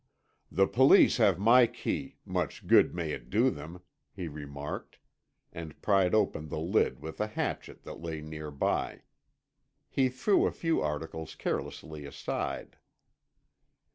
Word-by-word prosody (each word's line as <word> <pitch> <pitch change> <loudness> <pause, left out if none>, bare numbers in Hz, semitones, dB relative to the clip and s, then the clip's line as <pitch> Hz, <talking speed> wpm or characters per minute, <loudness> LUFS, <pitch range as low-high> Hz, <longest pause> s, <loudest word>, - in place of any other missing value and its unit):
"The 95 +5 +4
Police 130 +6 +6
have - - +4
my 115 +5 +6
key—much - - -4
good - - +5
may 85 -3 -2
it 65 -4 -6
do 120 - +3
them," 85 +3 -9 0.3
he 90 -3 -6
remarked, 75 -1 -7 0.6
and 80 -2 -8
pried 95 -2 +3
open 100 -7 +1
the - - -4
lid 85 0 +1
with 80 +5 -6
a 105 - +1
hatchet 110 - -4
that - - -9
lay 80 -2 -4
near 75 0 -7
by. 70 -1 -1 0.9
He 130 -1 +2
threw 130 +11 +2
a - - -1
few 165 -1 0
articles 80 +1 -4
carelessly 75 +1 -4
aside. - - -4
80 Hz, 135 wpm, -30 LUFS, 75-105 Hz, 0.9 s, Police